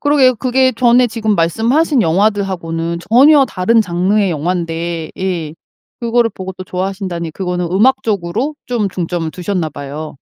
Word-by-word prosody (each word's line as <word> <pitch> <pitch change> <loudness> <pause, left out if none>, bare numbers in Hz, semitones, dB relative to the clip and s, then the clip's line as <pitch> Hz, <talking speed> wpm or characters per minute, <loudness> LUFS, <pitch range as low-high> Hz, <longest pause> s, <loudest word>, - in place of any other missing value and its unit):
그러게요 280 -3 +4
그게 260 +1 +2
전에 245 +1 +4
지금 220 -2 -1
말씀하신 235 - +2
영화들하고는 170 -3 0
전혀 280 +4 +6
다른 225 +3 +2
장르의 190 +1 +1
영화인데 165 0 -3
예 175 -5 -3 0.5
그걸 235 0 +2
보고 190 0 -6
또 185 0 -9
좋아하신다니 185 -2 -4
그거는 180 0 -3
음악적으로 215 - +1
좀 230 -5 -1
중점을 175 -3 -3
두셨나 180 -1 -3
봐요. 145 +1 -7
190 Hz, 350 characters per minute, -16 LUFS, 170-235 Hz, 0.5 s, 전혀